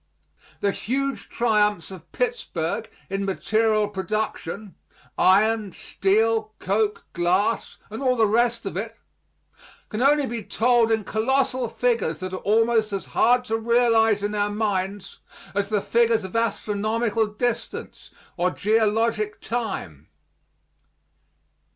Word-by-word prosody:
The 200 Hz, -, +2 dB
huge 275 Hz, +6 st, -3 dB
triumphs 210 Hz, -6 st, +1 dB
of 175 Hz, -3 st, -12 dB
Pittsburg 225 Hz, -, -2 dB, 0.2 s
in 195 Hz, +1 st, -2 dB
material 215 Hz, +2 st, +1 dB
production 205 Hz, -1 st, -4 dB, 0.4 s
iron, 210 Hz, +1 st, +3 dB
steel, 215 Hz, +4 st, 0 dB
coke, 210 Hz, +2 st, -1 dB
glass, 185 Hz, +6 st, 0 dB
and 220 Hz, -, -6 dB
all 255 Hz, -2 st, +2 dB
the 225 Hz, -2 st, +4 dB
rest 235 Hz, +2 st, +1 dB
of 195 Hz, -, -4 dB
it 225 Hz, +4 st, -4 dB, 0.9 s
can 215 Hz, -, -3 dB
only 285 Hz, +2 st, +4 dB
be 235 Hz, -2 st, -4 dB
told 230 Hz, +3 st, +2 dB
in 220 Hz, -1 st, +1 dB
colossal 255 Hz, +3 st, 0 dB
figures 230 Hz, -12 st, 0 dB
that 185 Hz, +1 st, -5 dB
are -, -, -2 dB
almost 220 Hz, +1 st, +2 dB
as 195 Hz, -1 st, -3 dB
hard 245 Hz, +1 st, +3 dB
to 225 Hz, -1 st, -1 dB
realize 225 Hz, -2 st, +3 dB
in 205 Hz, +1 st, -1 dB
our 205 Hz, 0 st, 0 dB
minds 205 Hz, -2 st, -2 dB, 0.3 s
as 200 Hz, 0 st, -1 dB
the 210 Hz, -2 st, +1 dB
figures 230 Hz, -1 st, +2 dB
of 190 Hz, +3 st, -8 dB
astronomical 220 Hz, 0 st, 0 dB
distance 230 Hz, +3 st, -4 dB, 0.3 s
or 180 Hz, +1 st, +2 dB
geologic 215 Hz, +1 st, +1 dB
time. 195 Hz, -, -4 dB
215 Hz, 120 wpm, -24 LUFS, 200-230 Hz, 0.9 s, the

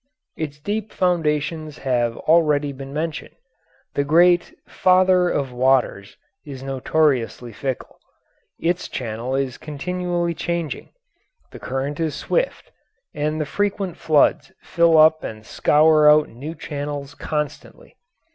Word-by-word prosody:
Its 150 Hz, -2 st, -5 dB
deep 210 Hz, +6 st, -3 dB
foundations 155 Hz, -4 st, -1 dB
have 120 Hz, -3 st, -1 dB
already 150 Hz, -3 st, +2 dB
been 135 Hz, 0 st, -9 dB
mentioned. 155 Hz, +2 st, -4 dB, 0.6 s
The 140 Hz, -, 0 dB
great 175 Hz, +4 st, +3 dB
"Father 185 Hz, -1 st, +3 dB
of 135 Hz, -5 st, -1 dB
Waters" 125 Hz, -6 st, +1 dB, 0.3 s
is 135 Hz, -3 st, -9 dB
notoriously 135 Hz, -3 st, 0 dB
fickle; 130 Hz, +3 st, -5 dB, 0.6 s
its 175 Hz, +1 st, -1 dB
channel 120 Hz, +2 st, -4 dB
is 135 Hz, -2 st, -2 dB
continually 175 Hz, +3 st, -2 dB
changing, 170 Hz, -1 st, -4 dB, 0.6 s
the -, -, -10 dB
current 135 Hz, +3 st, -4 dB
is 160 Hz, -3 st, -1 dB
swift, -, -, -2 dB, 0.4 s
and 150 Hz, +1 st, -2 dB
the 155 Hz, -, -1 dB
frequent 200 Hz, +1 st, -2 dB
floods 155 Hz, -4 st, +2 dB
fill 170 Hz, -2 st, +3 dB
up 155 Hz, 0 st, +5 dB
and 110 Hz, 0 st, -7 dB
scour 155 Hz, +3 st, +4 dB
out 150 Hz, 0 st, +5 dB
new 145 Hz, +8 st, -8 dB
channels 145 Hz, -1 st, -5 dB
constantly. 150 Hz, 0 st, -5 dB
150 Hz, 120 wpm, -22 LUFS, 135-170 Hz, 0.6 s, up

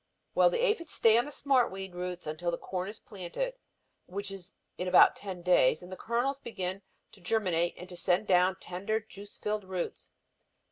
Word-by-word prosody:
"Well, -, -, +6 dB
the -, -, +1 dB
aphids 380 Hz, -9 st, 0 dB
stay 225 Hz, -1 st, +5 dB
on 240 Hz, -, 0 dB
the 295 Hz, -, -7 dB
smart 270 Hz, -3 st, +2 dB
weed 190 Hz, -1 st, -6 dB
roots 180 Hz, 0 st, -5 dB
until 155 Hz, +3 st, -2 dB
the 170 Hz, -, -1 dB
corn 185 Hz, 0 st, -4 dB
is 210 Hz, -, -7 dB
planted, 210 Hz, -, -4 dB, 0.5 s
which 200 Hz, +2 st, -4 dB
is 195 Hz, -1 st, -9 dB, 0.2 s
in 180 Hz, -, -3 dB
about 180 Hz, -, +7 dB
ten 185 Hz, -3 st, -7 dB
days, 175 Hz, -4 st, +4 dB
and 180 Hz, -, -11 dB
the -, -, -4 dB
kernels 245 Hz, +7 st, -1 dB
begin 190 Hz, -6 st, -4 dB, 0.3 s
to 200 Hz, -, -17 dB
germinate 175 Hz, -3 st, +1 dB
and 180 Hz, -, -9 dB
to 180 Hz, -, -9 dB
send 180 Hz, +3 st, +1 dB
down 185 Hz, -1 st, +4 dB
the -, -, -17 dB
tender 200 Hz, +5 st, -1 dB
juice 205 Hz, -1 st, -11 dB
filled 210 Hz, 0 st, -2 dB
roots. 185 Hz, -2 st, -5 dB
190 Hz, 195 wpm, -30 LUFS, 180-220 Hz, 0.5 s, about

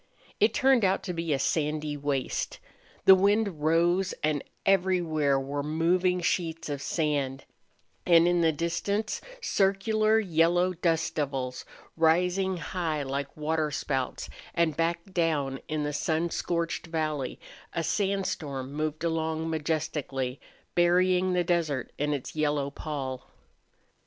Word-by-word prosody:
It 215 Hz, +1 st, +3 dB
turned 265 Hz, -3 st, +4 dB
out 190 Hz, 0 st, +2 dB
to 180 Hz, -, -3 dB
be 165 Hz, -1 st, -2 dB
a 140 Hz, -, +3 dB
sandy 150 Hz, +1 st, -1 dB
waste. 140 Hz, -2 st, -2 dB, 0.5 s
The 190 Hz, -, +10 dB
wind 200 Hz, -3 st, +2 dB
rose 175 Hz, +4 st, +2 dB
and 150 Hz, -2 st, +1 dB, 0.2 s
everywhere 175 Hz, -7 st, +2 dB
were 140 Hz, +2 st, -3 dB
moving 175 Hz, +4 st, +1 dB
sheets 165 Hz, -2 st, -1 dB
of 140 Hz, -1 st, -3 dB
sand, 145 Hz, -5 st, -1 dB, 0.6 s
and 170 Hz, -1 st, +5 dB
in 175 Hz, -1 st, +3 dB
the 165 Hz, -1 st, +4 dB
distance 170 Hz, +7 st, -2 dB, 0.2 s
circular 215 Hz, -, +2 dB
yellow 175 Hz, -1 st, +2 dB
dust 165 Hz, -2 st, 0 dB
devils, 135 Hz, -4 st, -3 dB, 0.3 s
rising 180 Hz, +3 st, +2 dB
high 165 Hz, -4 st, -2 dB
like 140 Hz, +1 st, -4 dB
water 155 Hz, 0 st, 0 dB
spouts, 135 Hz, -3 st, -2 dB, 0.3 s
and 170 Hz, -3 st, +2 dB
back 170 Hz, +1 st, 0 dB
down 150 Hz, -6 st, 0 dB
in 155 Hz, -1 st, -2 dB
the 150 Hz, 0 st, -2 dB
sun 160 Hz, +3 st, 0 dB
scorched 170 Hz, 0 st, -2 dB
valley 155 Hz, -5 st, -2 dB, 0.3 s
a 170 Hz, -, -2 dB
sandstorm 160 Hz, -10 st, -2 dB
moved 155 Hz, +1 st, -3 dB
along 160 Hz, -1 st, -1 dB
majestically, 150 Hz, -4 st, -2 dB, 0.3 s
burying 180 Hz, +1 st, +3 dB
the 180 Hz, -1 st, +2 dB
desert 160 Hz, -7 st, 0 dB
in 150 Hz, +1 st, 0 dB
its 140 Hz, 0 st, -4 dB
yellow 145 Hz, -2 st, 0 dB
pall. 135 Hz, -4 st, -5 dB
160 Hz, 125 wpm, -28 LUFS, 145-180 Hz, 0.6 s, The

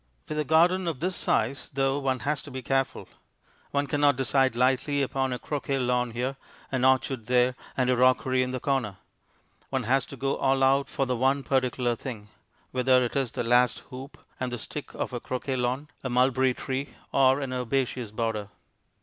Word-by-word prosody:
With 155 Hz, -, -3 dB
a -, -, +2 dB
garden 170 Hz, +5 st, +3 dB
of 160 Hz, -6 st, -2 dB
this 180 Hz, +2 st, -1 dB
size, 140 Hz, -, 0 dB
though, 135 Hz, 0 st, +1 dB
one 130 Hz, -2 st, -1 dB
has 145 Hz, 0 st, -1 dB
to -, -, -11 dB
be 130 Hz, -1 st, -6 dB
careful. 135 Hz, +1 st, -1 dB, 0.6 s
One 140 Hz, 0 st, 0 dB
cannot 145 Hz, 0 st, +3 dB
decide 135 Hz, -1 st, +2 dB
lightly 130 Hz, +3 st, +2 dB
upon 135 Hz, 0 st, -1 dB
a 125 Hz, -, -1 dB
croquet 140 Hz, 0 st, -2 dB
lawn 125 Hz, -1 st, +1 dB
here, 125 Hz, +4 st, -3 dB, 0.3 s
an 130 Hz, -2 st, 0 dB
orchard 130 Hz, -3 st, +2 dB
there, 125 Hz, 0 st, +3 dB, 0.2 s
and 130 Hz, -1 st, +2 dB
a 125 Hz, -, +3 dB
rockery 130 Hz, +1 st, +3 dB
in 130 Hz, -, 0 dB
the 130 Hz, 0 st, -3 dB
corner; 125 Hz, -8 st, -1 dB, 0.7 s
one -, -, -1 dB
has 130 Hz, +3 st, +1 dB
to 135 Hz, -, -9 dB
go 135 Hz, +2 st, -1 dB
all 135 Hz, 0 st, +2 dB
out 135 Hz, +1 st, +3 dB
for 135 Hz, -, -1 dB
the 125 Hz, -1 st, -1 dB
one 135 Hz, +3 st, +1 dB
particular 125 Hz, -2 st, 0 dB
thing, 110 Hz, -4 st, -8 dB, 0.4 s
whether 130 Hz, 0 st, +3 dB
it 120 Hz, -, -5 dB
is 135 Hz, -4 st, 0 dB
the -, -, -2 dB
last 125 Hz, +1 st, +3 dB
hoop 130 Hz, +3 st, -9 dB, 0.2 s
and 130 Hz, -1 st, -2 dB
the 120 Hz, -, -3 dB
stick 145 Hz, +5 st, -5 dB
of -, -, -3 dB
a 120 Hz, -, -2 dB
croquet 130 Hz, +2 st, -3 dB
lawn, 130 Hz, +4 st, -1 dB, 0.2 s
a 130 Hz, -, -2 dB
mulberry 130 Hz, +1 st, +3 dB
tree, 135 Hz, +1 st, -4 dB, 0.2 s
or 135 Hz, 0 st, +4 dB
an 135 Hz, -2 st, -3 dB
herbaceous 125 Hz, -1 st, -1 dB
border. 110 Hz, -2 st, -2 dB
130 Hz, 190 wpm, -27 LUFS, 125-135 Hz, 0.7 s, or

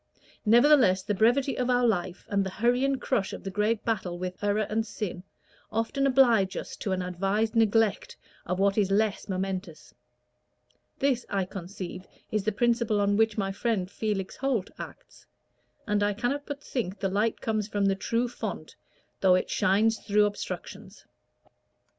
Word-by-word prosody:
Nevertheless, 235 Hz, -5 st, +5 dB
the 205 Hz, -, -1 dB
brevity 245 Hz, +7 st, +2 dB
of 250 Hz, 0 st, 0 dB
our 245 Hz, 0 st, +3 dB
life, 185 Hz, -5 st, -1 dB
and 200 Hz, -1 st, +1 dB
the 190 Hz, -, -3 dB
hurry 240 Hz, +6 st, +1 dB
and 275 Hz, -1 st, +1 dB
crush 215 Hz, -7 st, -1 dB
of -, -, -7 dB
the 195 Hz, -, -4 dB
great 210 Hz, +2 st, 0 dB
battle 190 Hz, -6 st, -1 dB
with 185 Hz, +2 st, -6 dB
error 205 Hz, +1 st, +1 dB
and 220 Hz, +1 st, 0 dB
sin, 205 Hz, -4 st, -5 dB, 0.5 s
often 230 Hz, +5 st, 0 dB
oblige 240 Hz, -8 st, +4 dB
us -, -, -6 dB
to 200 Hz, -, -3 dB
an 185 Hz, -1 st, -1 dB
advised 195 Hz, +5 st, -1 dB
neglect 225 Hz, -1 st, +2 dB, 0.3 s
of 180 Hz, +1 st, -1 dB
what 195 Hz, +2 st, +2 dB
is 200 Hz, -2 st, +2 dB
less 210 Hz, +1 st, 0 dB
momentous. 185 Hz, -3 st, -4 dB, 1.0 s
This, 265 Hz, -3 st, +1 dB
I 195 Hz, -2 st, 0 dB
conceive, 185 Hz, 0 st, -7 dB, 0.2 s
is 215 Hz, -2 st, -1 dB
the 215 Hz, -, +2 dB
principle 230 Hz, 0 st, +1 dB
on 205 Hz, 0 st, +2 dB
which 220 Hz, 0 st, +2 dB
my 195 Hz, -2 st, 0 dB
friend 200 Hz, -3 st, -1 dB
Felix 200 Hz, -4 st, -3 dB
Holt 255 Hz, -8 st, -1 dB
acts; -, -, -11 dB, 0.6 s
and 210 Hz, -1 st, 0 dB
I 205 Hz, 0 st, +2 dB
cannot 275 Hz, +6 st, -2 dB
but 290 Hz, 0 st, -6 dB
think 210 Hz, -6 st, -3 dB
the 195 Hz, -, 0 dB
light 210 Hz, +4 st, 0 dB
comes 215 Hz, -2 st, -1 dB
from 205 Hz, -2 st, 0 dB
the 195 Hz, -, +3 dB
true 230 Hz, +5 st, -1 dB
fount, 240 Hz, -, -6 dB, 0.4 s
though 185 Hz, -1 st, +5 dB
it 185 Hz, -, -1 dB
shines 220 Hz, +4 st, +2 dB
through 210 Hz, 0 st, +3 dB
obstructions." 205 Hz, 0 st, -6 dB
210 Hz, 165 wpm, -27 LUFS, 195-230 Hz, 1.0 s, Nevertheless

